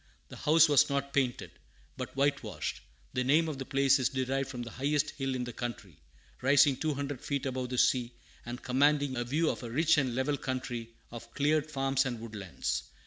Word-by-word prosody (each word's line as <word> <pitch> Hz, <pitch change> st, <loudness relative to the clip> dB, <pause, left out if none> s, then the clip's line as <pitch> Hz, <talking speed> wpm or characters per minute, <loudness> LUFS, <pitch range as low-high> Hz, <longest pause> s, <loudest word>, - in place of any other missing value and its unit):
The -, -, -9 dB
house 160 Hz, +1 st, +5 dB
was 145 Hz, -3 st, +5 dB
not 140 Hz, 0 st, -2 dB
painted, 130 Hz, -3 st, 0 dB, 0.4 s
but 130 Hz, 0 st, -6 dB
whitewashed. 140 Hz, +1 st, -1 dB, 0.3 s
The 125 Hz, 0 st, 0 dB
name 155 Hz, +6 st, +3 dB
of 150 Hz, -4 st, -4 dB
the 135 Hz, -, -4 dB
place 135 Hz, 0 st, +3 dB
is 130 Hz, -, +2 dB
derived 135 Hz, +1 st, -1 dB
from 125 Hz, -2 st, -5 dB
the 115 Hz, -, -8 dB
highest 145 Hz, +4 st, 0 dB
hill 135 Hz, -2 st, -3 dB
in 125 Hz, -, -2 dB
the 120 Hz, -1 st, -6 dB
county, 105 Hz, -, -6 dB, 0.4 s
rising 140 Hz, +1 st, +5 dB
two 155 Hz, +2 st, -1 dB
hundred 140 Hz, -1 st, -4 dB
feet 140 Hz, -2 st, -2 dB
above 130 Hz, -1 st, -3 dB
the 125 Hz, -, -3 dB
sea, 120 Hz, -1 st, +2 dB, 0.3 s
and 120 Hz, +1 st, -7 dB
commanding 140 Hz, +1 st, +2 dB
a 120 Hz, -, -1 dB
view 150 Hz, +7 st, +1 dB
of -, -, -7 dB
a 120 Hz, -, -6 dB
rich 155 Hz, +5 st, +3 dB
and 130 Hz, -4 st, -1 dB
level 135 Hz, +3 st, 0 dB
country, 125 Hz, -3 st, -4 dB, 0.2 s
of 115 Hz, 0 st, -9 dB
cleared 150 Hz, +1 st, +1 dB
farms 135 Hz, -1 st, +1 dB
and 120 Hz, -3 st, -4 dB
woodlands. 105 Hz, -5 st, -4 dB
135 Hz, 200 wpm, -30 LUFS, 125-145 Hz, 0.4 s, house